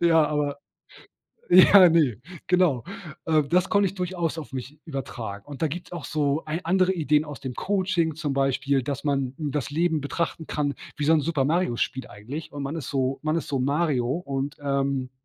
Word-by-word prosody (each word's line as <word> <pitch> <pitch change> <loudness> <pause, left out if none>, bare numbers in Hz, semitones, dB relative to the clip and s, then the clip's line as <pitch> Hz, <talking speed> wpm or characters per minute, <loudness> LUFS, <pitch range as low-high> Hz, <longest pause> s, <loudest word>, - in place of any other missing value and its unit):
Ja, 165 -2 +5
aber 145 -1 -1 0.9
ja, 185 +1 +9
ne, 145 - +2 0.3
genau. 180 -9 +3 0.4
Äh, 155 -2 +3
das 175 +6 +1
konnte 200 -1 +3
ich 190 - -2
durchaus 180 -3 -2
auf 145 - -10
mich 130 +3 -7
übertragen, 120 -9 -6
und 145 -2 -9
da 160 - +3
gibt's 175 +5 -7
auch 170 -4 -6
so 150 0 0
ei 155 +3 -3
andere 185 +2 +2
Ideen 155 -3 +2
aus 145 -2 -9
dem 130 -2 -5
Coaching 185 -4 0
zum 150 -3 -2
Beispiel, 135 0 +1
dass 140 +2 -4
man 135 -3 -1
das 150 -3 -2
Leben 160 +1 +1
betrachten 160 +2 -3
kann 145 -1 -1 0.2
wie 150 - -2
so 160 - +4
'n 160 - +4
Super 150 -2 0
Mario-Spiel 140 -5 0
eigentlich, 125 +10 -8
und 145 -1 -5
man 140 +3 -4
ist 150 - -5
so 135 -1 -1
man 155 +1 +1
ist 165 - -3
so 140 -2 0
Mario 140 -2 +1
und, 140 -1 -3
ähm, 140 -2 -1
150 Hz, 190 wpm, -25 LUFS, 135-170 Hz, 0.9 s, ja